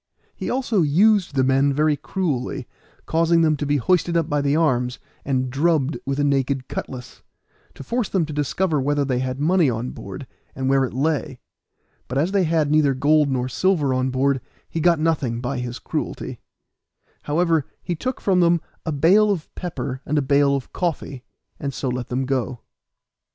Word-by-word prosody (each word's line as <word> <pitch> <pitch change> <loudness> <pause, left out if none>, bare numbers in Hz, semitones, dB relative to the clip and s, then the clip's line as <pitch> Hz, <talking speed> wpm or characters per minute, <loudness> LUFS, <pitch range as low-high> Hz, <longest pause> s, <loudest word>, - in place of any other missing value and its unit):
He - - -4
also 245 -6 +1
used 185 +3 +3
the 130 - +3
men 135 +2 +3
very 150 +1 +2
cruelly, 150 -3 -3 0.4
causing 165 +1 +3
them 155 -1 +3
to 145 - -3
be 145 0 +2
hoisted 170 +5 +2
up 165 -2 +1
by 145 0 0
the 140 +1 +1
arms, 125 -6 +1 0.3
and 130 -2 -1
drubbed 155 +1 +1
with 140 +1 -1
a - - +2
naked 135 -2 0
cutlass, 125 -2 -7 0.5
to - - -9
force 235 - -1
them 185 -5 +1
to 155 - -7
discover 150 +2 0
whether 145 +1 +1
they 130 -2 0
had 130 0 -3
money 165 0 +3
on 120 +1 -3
board, 100 +6 -8 0.3
and 130 -2 -2
where 135 0 +3
it - - -7
lay; 145 -1 -1 0.7
but 130 - -3
as 160 +7 +1
they 195 -3 +2
had 155 -2 +1
neither 150 -3 +3
gold 150 +2 +3
nor 130 -2 -1
silver 150 -1 +1
on 130 0 0
board 135 0 +1 0.3
he 165 - -4
got 170 +1 +4
nothing 145 -7 0
by 125 +1 -3
his 120 0 -4
cruelty; - - -4 0.9
however, 160 -1 +1 0.2
he 175 - -2
took 255 +10 -3
from 190 -2 +2
them 170 -1 +4 0.3
a - - +1
bale 185 +9 +4
of 185 -6 -2
pepper, 140 -7 -5
and 150 - -1
a - - +3
bale 140 0 +3
of 135 -3 -5
coffee, 145 -7 -3 0.4
and 140 -2 -4
so 135 - -3
let 125 -1 -3
them 130 +2 -1
go. 130 -2 -2
145 Hz, 185 wpm, -22 LUFS, 130-165 Hz, 0.9 s, got